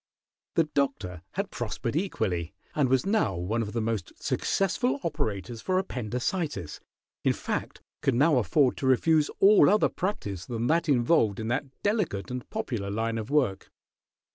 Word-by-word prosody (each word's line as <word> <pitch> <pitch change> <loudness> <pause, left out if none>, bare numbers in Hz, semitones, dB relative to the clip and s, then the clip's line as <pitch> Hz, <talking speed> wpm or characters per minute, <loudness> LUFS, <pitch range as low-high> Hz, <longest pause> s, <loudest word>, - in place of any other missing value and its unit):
The 165 - +5
Doctor 135 - -2
had 200 +2 -3
prospered 120 +2 -3
equally, 95 - -1 0.2
and 140 -4 +2
was 130 -1 +2
now 210 - +1
one 95 +7 -1
of 105 -2 -4
the 115 - 0
most 110 -5 -2
successful 245 +8 0
operators 115 - -3
for 185 -1 0
appendicitis; 125 - -2 0.4
in - - +3
fact, - - -4 0.2
could 135 - +2
now 145 +3 +4
afford 125 - +2
to 135 - -1
refuse 150 +4 +3
all 205 +2 +7
other 210 +2 +4
practice 105 - -3
than 115 -1 -2
that 165 +3 +2
involved 120 -5 +3
in 110 0 -3
that 130 +4 -1 0.2
delicate 190 - 0
and 125 -1 -5
popular 100 -6 -3
line 115 +2 -1
of 110 - -6
work. 130 -10 +1
125 Hz, 155 wpm, -28 LUFS, 110-165 Hz, 0.4 s, all